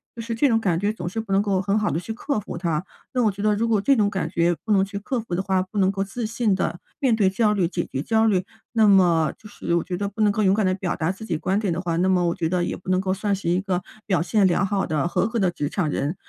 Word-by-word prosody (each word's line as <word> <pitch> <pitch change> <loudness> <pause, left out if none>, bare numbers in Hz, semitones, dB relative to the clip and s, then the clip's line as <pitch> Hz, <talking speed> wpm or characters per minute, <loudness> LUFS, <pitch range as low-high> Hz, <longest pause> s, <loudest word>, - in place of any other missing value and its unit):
就 230 - -6
是 230 0 -4
这 285 +5 +3
种 225 -1 +3
感 175 -6 0
觉 205 +2 +1
总 175 -5 -6
是 225 - -4
不 205 -3 -9
能 195 - +4
够 195 -2 0
很 200 +2 0
好 210 - 0
地 160 - -1
去 220 +5 -5
克 245 0 -2
服 190 - -7
它。 170 -1 -1 0.3
那 250 -2 +2
我 215 - +3
觉 200 +1 -8
得 210 0 +2
如 230 +2 0
果 215 -3 +2
这 275 +5 +4
种 205 -3 +2
感 190 -2 -2
觉 170 0 +1
不 215 - -2
能 195 -2 +4
去 200 0 -6
克 240 +4 -2
服 215 -6 -6
的 185 - 0
话， 190 -1 +1
不 190 +3 -7
能 190 0 +3
够 195 0 -2
自 225 +3 -5
信 225 -2 0
地 175 - -2 0.2
面 255 -5 +3
对 200 -4 +3
焦 210 +2 +2
虑、 185 -5 +1
解 175 -1 -3
决 135 - -4
焦 225 +5 +2
虑， 190 -4 +2 0.3
那 220 -2 +4
么 175 -5 +4
就 210 - -14
是 170 - -2
我 170 - +1
觉 180 -1 -4
得 200 +1 -2
不 205 +2 -5
能 210 -1 +4
够 215 +1 0
勇 190 0 +4
敢 215 -3 +1
地 185 - +2
表 180 -2 -2
达 160 +3 0
自 210 +3 -9
己 165 -7 -1
观 190 +5 0
点 195 -6 -1
的 175 - -3
话， 170 -2 -2
那 185 +2 +2
么 180 -2 +3
我 170 - +1
觉 165 - -1
得 175 0 0
也 - - -3
不 185 - -10
能 185 0 +2
够 190 -1 0
算 200 0 -1
是 185 -3 -3
一 180 +2 +2
个 190 -2 -1 0.2
表 185 -5 +1
现 195 +2 +3
良 180 +2 +2
好 195 0 0
的、 155 +1 0
合 185 +4 +1
格 230 0 -2
的 185 -3 +2
职 145 -3 -3
场 175 -7 -1
人。 145 +4 -2
195 Hz, 345 characters per minute, -23 LUFS, 180-215 Hz, 0.3 s, 能